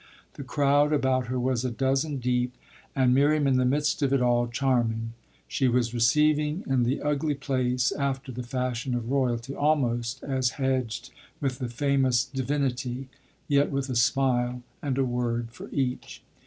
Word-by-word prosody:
The 140 - -8
crowd 145 +2 +2
about 130 -3 +1
her 125 +1 -2
was 125 -1 0
a 130 - 0
dozen 135 +4 0
deep 125 0 -1 0.4
and 130 -2 +3
Miriam 145 +2 +3
in 135 -2 +3
the 130 - +2
midst 150 +4 +1
of 140 -2 +2
it 140 - +3
all 120 -1 +2
charming; 120 -3 0 0.3
she 135 - +1
was 120 -1 +1
receiving 150 +6 +2
in 135 -2 +1
the 125 +3 0
ugly 150 0 0
place 130 -2 0
after 135 -2 -2
the 125 +1 -5
fashion 125 0 -2
of 120 0 -3
royalty, 130 -2 0
almost 130 -5 0
as 130 -3 0
hedged 130 -4 -1 0.3
with 130 -3 -2
the 125 - -3
famous 130 -1 +2
"divinity," 130 -1 -2 0.4
yet 140 0 +3
with 135 -1 -2
a - - -2
smile 125 0 +1 0.2
and 135 -3 -2
a 135 - +2
word 120 -1 -2
for - - -10
each. 130 -3 -3
130 Hz, 165 wpm, -27 LUFS, 125-140 Hz, 0.4 s, and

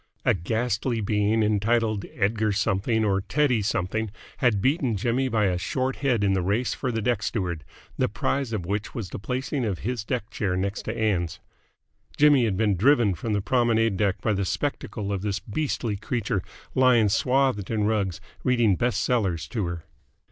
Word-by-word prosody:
A - - +5
ghastly 115 +5 -1
being 105 +1 +1
entitled 110 0 +1
Edgar 105 +1 +1
Something 105 +3 +1
or 100 -1 +1
Teddy 125 +4 +1
Something 105 +2 -1 0.3
had 120 -7 +2
beaten 130 - +1
Jimmy 120 +5 0
by 110 -3 +2
a 90 -2 +1
short 130 +8 -1
head 125 -6 +1
in 100 -1 +3
the 95 - +1
race 105 +7 0
for 130 - -2
the 115 -2 -2
deck 120 -3 +1
steward, 90 -8 -2 0.4
the - - +2
prize 135 -4 -1
of 105 -6 -3
which 100 +3 -3
was 110 -7 -4
the - - -5
placing 130 +5 -2
of 100 -5 -1
his 120 -3 -2
deck 115 -1 -3
chair 95 -3 -1
next 100 +2 -2
to 110 +1 -3
Ann's. 90 -6 0 0.8
Jimmy 145 -4 +5
had 100 -4 0
been 105 -2 +2
driven 115 0 +4
from 105 +6 -3
the 100 - +1
promenade 115 -1 +2
deck 95 -1 0
by 110 - +1
the 100 0 0
spectacle 105 -2 -3
of 95 - -2
this 100 -1 -1
beastly 115 -3 -2
creature 110 -2 -2 0.3
lying 125 -4 +5
swathed 125 -1 +1
in 110 -2 0
rugs 105 -5 0 0.2
reading 120 -6 +3
best 120 +5 0
sellers 95 -9 0
to 105 -7 -2
her. 85 -1 -5
110 Hz, 180 wpm, -25 LUFS, 100-120 Hz, 0.8 s, A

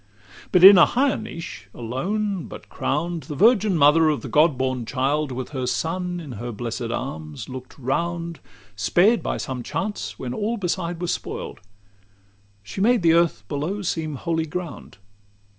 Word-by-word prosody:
LXI 100 +1 -22
But 180 -1 +4
in 195 0 +12
a - - +9
higher 270 +2 +2
niche, 170 -6 -8
alone, 185 - -2
but - - -11
crowned, 165 +4 -2
The 145 +2 -7
Virgin 210 - +4
Mother 155 +2 +5
of 150 - -1
the - - -6
God 150 -2 +4
born 130 -1 -1
Child, 135 +4 -1
With 125 0 -5
her 130 -3 -3
Son 175 +7 -2
in 155 -5 -8
her 120 +1 -5
blessed 115 +1 -4
arms, 80 - -5
look'd 130 -1 -9
round, 170 +5 -2 0.4
Spared 190 - +3
by - - -2
some 130 -2 -4
chance 205 - -4
when 125 -1 -5
all 220 +3 -1
beside 175 -3 -2
was 175 - -1
spoil'd; - - -6 1.0
She 150 - -6
made 235 -1 +3
the 165 -1 +5
earth 170 -11 +2
below 165 - -3
seem 160 -4 -2
holy 160 +3 -2
ground. 170 -2 -7
160 Hz, 165 wpm, -23 LUFS, 130-180 Hz, 1.0 s, in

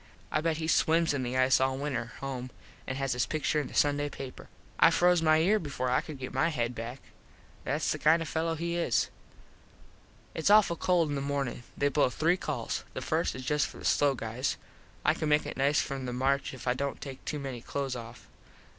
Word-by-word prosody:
I 155 - +1
bet 160 -1 0
he 160 0 -3
swims 165 0 +3
in 140 - -1
the 125 0 -2
ice 130 0 +4
all 130 0 +1
winter 125 -5 -3
home 130 -2 -4 0.4
and 130 - -3
has 135 -1 0
his 125 - 0
pictur 155 0 0
in 140 - -5
the - - -11
Sunday 145 0 +2
paper. 135 -2 -9 0.3
I - - +8
froze 180 -1 +4
my 155 -1 +5
ear 195 +7 +3
before 130 -6 -3
I - - +3
could 155 -3 -8
get 130 -1 -6
my 135 +5 +2
head 120 -6 -1
back. 120 +3 -6 0.7
Thats - - 0
the - - -2
kind 160 +2 +5
of 165 - -4
a - - -7
fello 165 0 0
he 170 +1 -2
is. 170 -9 +1 1.2
Its 160 - 0
awful 205 -4 +6
cold 170 -2 +2
in - - -2
the 140 - -2
mornin. 140 -3 -2 0.2
They 145 - +2
blow 145 -2 +3
three 165 +7 +2
calls. 145 -10 -3
The - - -3
first - - 0
is 130 0 -7
just 150 0 +1
for - - -12
the - - -9
slow 140 -2 +3
guys. 120 +3 -2 0.5
I - - +5
can 155 - -2
make 150 0 +3
it - - -5
nice 140 +2 +3
from 135 -2 -4
the 125 - -3
march 135 +2 +1
if 130 - -10
I 125 - +4
dont 140 +2 -3
take 135 -2 -8
too 150 - -3
many 135 -4 -5
close 135 0 -3
off. 120 0 -9
140 Hz, 225 wpm, -30 LUFS, 130-155 Hz, 1.2 s, I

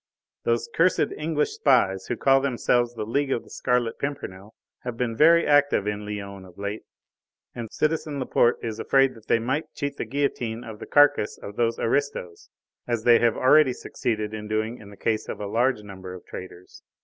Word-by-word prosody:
Those 115 0 +1
cursed 175 +2 +2
English 150 -1 -1
spies 95 -9 +2
who 120 - -1
call 135 0 +4
themselves 120 -2 +1
the 110 -2 -4
League 140 +5 -1
of 120 - -1
the - - -18
Scarlet 125 -2 0
Pimpernel 110 -8 -6 0.2
have 125 -2 -6
been 115 -2 -1
very 165 +5 +5
active 145 -7 +3
in 105 0 -3
Lyons 100 -2 -6
of 90 - -18
late, 100 +2 -4 0.7
and 115 -2 -7
citizen 155 -1 -1
Laporte 120 -2 +2
is 115 -1 -4
afraid 135 +1 +3
that 110 -2 -17
they - - +4
might 130 +7 -2
cheat 145 -1 -3
the - - -3
guillotine 120 -3 -2
of 110 -2 -9
the - - -8
carcase 145 -7 +4
of 100 - -9
those 115 0 0
aristos, 115 -9 -2 0.4
as 120 -2 -1
they 120 -1 +6
have 120 -1 +2
already 130 0 +5
succeeded 110 -4 -3
in 105 -1 -6
doing 110 +2 -2
in 105 - -12
the 100 - -14
case 110 +2 -1
of - - -5
a 105 - -4
large 115 +2 +1
number 95 -2 -9
of 90 - -12
traitors." 90 -1 -10
115 Hz, 190 wpm, -25 LUFS, 105-135 Hz, 0.7 s, they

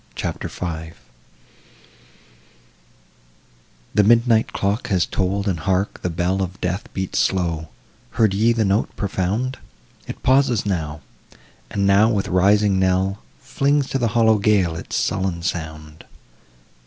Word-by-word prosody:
CHAPTER - - -4
V 80 -2 -6 3.0
The 105 - +4
midnight 115 +1 +3
clock 100 +3 -1
has 90 -5 +1
toll'd; 100 +2 -1
and 90 -4 -1
hark, 95 +4 -1
the 90 - -1
bell 90 +3 -1
Of 95 0 -4
death 90 +3 -3
beats 95 -1 -2
slow! 85 -4 0 0.5
heard 110 -4 +3
ye 110 +4 +3
the 115 -2 +1
note 100 +2 +1
profound? 105 +6 -2 0.5
It - - -8
pauses 130 -5 +3
now; 80 -6 -3 0.7
and 100 -1 -1
now 100 +3 +5
with 105 -4 -1
rising 100 +2 +3
knell 95 +1 +1 0.2
Flings 140 +1 0
to 135 - 0
the 120 - +1
hollow 110 -2 +4
gale 100 -5 +2
its 80 - -6
sullen 95 -3 -1
sound. 80 -3 -5
95 Hz, 130 wpm, -21 LUFS, 90-110 Hz, 3.0 s, now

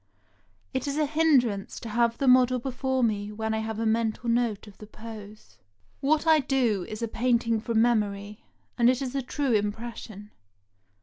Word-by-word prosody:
It 260 +2 -2
is 280 +1 -2
a 305 - +2
hindrance 275 -10 +1
to 230 - -7
have 235 +1 +1
the 275 - -1
model 255 0 +5
before 260 +1 -2
me 210 -2 -1
when 220 +1 -3
I 220 - -1
have 220 0 -4
a 225 - -2
mental 225 +1 0
note 230 -3 0
of 205 -2 -15
the 210 - -11
pose. 215 -1 -11 0.4
What 300 +3 +1
I 320 -1 +5
do 250 -8 0
is 215 +2 -6
a - - 0
painting 230 -1 +1
from 225 -1 +2
memory, 210 -3 -1 0.4
and 240 0 +6
it 255 0 +2
is 255 -1 -4
a 275 - -1
true 265 0 -1
impression. 210 0 -4
230 Hz, 180 wpm, -27 LUFS, 215-255 Hz, 0.4 s, and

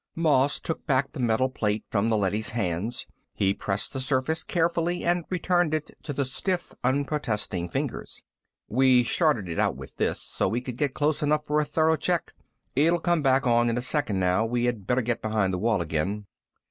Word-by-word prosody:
Moss 145 -4 +3
took 160 - -4
back 135 -1 +2
the 150 - -8
metal 120 +1 +2
plate 110 -5 -1
from 110 +1 +1
the 110 - +2
leady's 105 +2 0
hands. 100 +3 -2 0.3
He 100 -1 +2
pressed 100 0 -2
the 135 - -3
surface 130 +4 +1
carefully 170 +1 0
and 175 -1 +1
returned 175 -3 +1
it 155 -1 -4
to 150 - -5
the 140 -1 -1
stiff, 180 +8 -2
unprotesting 125 - -1
fingers. - - -4 0.4
"We 130 +1 +4
shorted 120 - +1
it 85 - -3
out - - +2
with - - -11
this, - - 0
so - - -2
we 110 +5 0
could 125 -1 -7
get 140 -2 0
close 150 +1 +1
enough 150 +1 +1
for 150 +1 +1
a 150 - +1
thorough 160 +1 +2
check. 175 0 -1 0.4
It'll 165 +6 +4
come 175 -1 +1
back 135 0 +3
on 120 -1 +3
in 115 - 0
a - - 0
second 130 -8 -1
now. 90 +3 +2
We 120 +1 0
had 115 -6 -2
better 125 0 +2
get 120 0 -1
behind 105 -3 0
the 90 - -1
wall 110 -2 +1
again." 90 +7 -2
130 Hz, 200 wpm, -26 LUFS, 110-150 Hz, 0.4 s, We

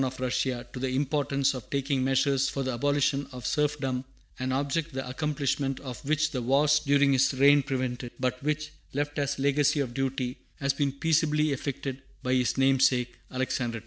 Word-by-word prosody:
of 130 0 -3
Russia 125 -1 -1
to 125 - -5
the 130 0 -1
importance 140 -1 +1
of 125 -4 -8
taking 140 -1 0
measures 135 +1 +2
for 135 - -3
the 130 -1 -2
abolition 140 +2 +1
of 125 -3 -8
serfdom, 140 -3 0 0.4
an 130 0 -1
object 145 +4 -1
the 135 -1 -4
accomplishment 140 -1 -1
of 130 -1 -7
which 155 +2 +1
the 130 - -2
wars 145 +5 +3
during 140 -1 +3
his 135 +1 +3
reign 140 +2 +6
prevented, 130 -2 -3
but 125 0 -1
which, 150 +1 -2 0.2
left 145 +1 -2
as 140 -1 -1
a - - -5
legacy 145 +1 +3
of 130 -4 -2
duty, 130 -1 -2 0.2
has 140 -1 +1
been 140 0 0
peaceably 155 +1 +2
effected 135 -1 -4 0.2
by 125 - +1
his 125 0 +1
namesake, 130 -2 +3 0.2
Alexander 125 -2 -1
II. - - -6
135 Hz, 180 wpm, -28 LUFS, 130-145 Hz, 0.4 s, reign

